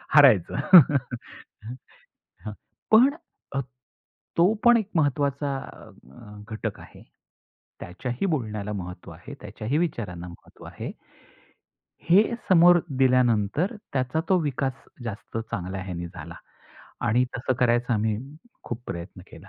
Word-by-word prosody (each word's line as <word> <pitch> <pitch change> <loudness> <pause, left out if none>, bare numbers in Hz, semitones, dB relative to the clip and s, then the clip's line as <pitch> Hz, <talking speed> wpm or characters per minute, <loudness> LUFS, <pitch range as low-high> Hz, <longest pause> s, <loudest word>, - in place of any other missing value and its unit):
हरायचं. 125 - +6 2.4
पण 240 +5 +7 1.3
तो 180 +6 +5
पण 240 -1 +7
एक 210 -3 -3
महत्त्वाचा 145 -2 0
अ, 105 - -13
घटक 110 - -5
आहे. - - -14 0.8
त्याच्याही 120 - -4
बोलण्याला 105 - -2
महत्त्व 90 -3 -7
आहे. 105 +13 -11
त्याच्याही 110 +7 -3
विचारांना 100 - -3
महत्त्व 85 - -14
आहे. - - -7 1.1
हे 190 +5 +6 0.3
समोर 175 -1 +7 0.2
दिल्यानंतर 125 - +2 0.2
त्याचा 130 +3 0
तो 190 - +4
विकास 135 -3 -1 0.3
जास्त 110 0 -7
चांगल्या 95 -4 -5
ह्याने 85 -2 -5
झाला. 85 -2 -10 0.7
आणि 120 +3 +3
तसं 130 +1 -1
करायचा 120 0 +2
आम्ही 110 0 0 0.5
खूप 120 0 -5
प्रयत्न 85 +2 -7
केला. - - -14
120 Hz, 105 wpm, -25 LUFS, 100-145 Hz, 2.4 s, पण